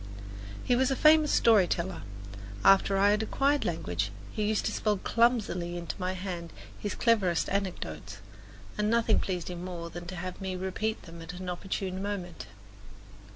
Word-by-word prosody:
He 245 - +2
was 260 +1 +3
a 270 - +1
famous 305 +1 +6
story 215 -6 +5
teller; 175 +2 -2 0.6
after 195 0 +6
I 200 +1 +5
had 210 +1 +2
acquired 275 +6 +1
language 100 - -1 0.2
he - - -4
used 215 0 0
to - - 0
spell 210 -2 0
clumsily 200 -7 +1
into 170 -1 -5
my 185 0 -1
hand 180 -3 -5 0.3
his 205 - -3
cleverest 200 -8 +2
anecdotes, 105 - -3 0.6
and 210 0 +2
nothing 230 -1 +3
pleased 180 -2 -3
him 175 0 -6
more 170 -2 -6
than 175 +1 -8
to 185 - -6
have 185 +2 -6
me 190 -1 -3
repeat 190 +4 -2
them 165 -1 -11
at 165 +2 -8
an 180 0 -6
opportune 185 +1 -3
moment. 195 -4 -5
185 Hz, 165 wpm, -29 LUFS, 175-215 Hz, 0.6 s, famous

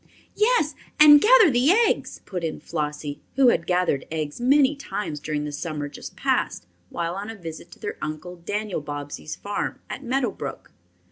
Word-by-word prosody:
"Yes, 425 -8 +3 0.3
and 295 -1 +9
gather 445 - +7
the 245 +3 +3
eggs," 445 +5 +2
put 180 -4 -5
in 160 -1 -3
Flossie, 150 -1 -4
who 265 -2 +6
had 165 - +1
gathered 180 -6 +1
eggs 155 +4 -4
many 275 +3 +4
times 210 - -4
during 150 0 -3
the 150 - -4
summer 150 -1 -4
just 145 - -10
past, - - 0 0.2
while 170 0 -3
on 200 +3 -5
a 225 - -6
visit 165 -5 -9
to - - -15
their - - -5
Uncle 155 +4 -5
Daniel 205 +1 -3
Bobbsey's 145 +1 -6
farm 205 0 -4
at 270 - -6
Meadow 255 0 0
Brook. - - -7
180 Hz, 175 wpm, -24 LUFS, -, 0.3 s, and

